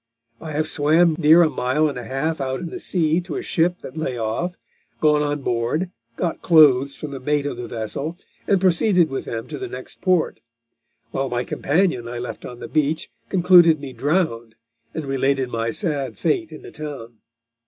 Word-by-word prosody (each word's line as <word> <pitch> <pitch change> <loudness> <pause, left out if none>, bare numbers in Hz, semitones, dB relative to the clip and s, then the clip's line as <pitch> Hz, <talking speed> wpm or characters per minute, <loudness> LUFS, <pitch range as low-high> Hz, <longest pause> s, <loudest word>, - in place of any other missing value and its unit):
I 160 -2 -7
have 155 +1 0
swam 160 +3 +3
near 160 +3 +7
a 160 - +3
mile 130 +4 +1
and 145 - -3
a 125 - -5
half 135 +6 -2
out 130 -1 -2
in 175 -2 -6
the - - -6
sea 165 -1 +1
to 175 -3 -6
a - - -3
ship 175 -1 0
that 130 - -9
lay 155 -6 -3
off, 115 +11 -2 0.4
gone 150 -1 +3
on 145 -1 -2
board, 125 +11 -1 0.2
got 170 +4 -2
clothes 140 -4 +5
from 150 - -7
the 135 - -6
mate 145 +2 0
of 145 - -3
the 120 - -6
vessel, 140 +9 -4 0.3
and 195 - +3
proceeded 180 -2 +3
with 135 - -3
them 115 -1 -5
to 150 -2 -6
the - - -4
next 125 +1 -9
port; 180 -3 +1 0.7
while 135 0 -2
my 120 0 -1
companion 145 -6 0
I 120 +1 -5
left 120 +1 -6
on 125 - -8
the - - -8
beach 155 +1 0 0.2
concluded 175 -4 +6
me 140 -2 -8
drowned, 130 -8 -1 0.4
and 160 - -3
related 135 -1 0
my 115 -1 -2
sad 145 - -2
fate 165 0 0
in 155 - -10
the - - -10
town. 130 -7 -8
150 Hz, 195 wpm, -22 LUFS, 130-165 Hz, 0.7 s, near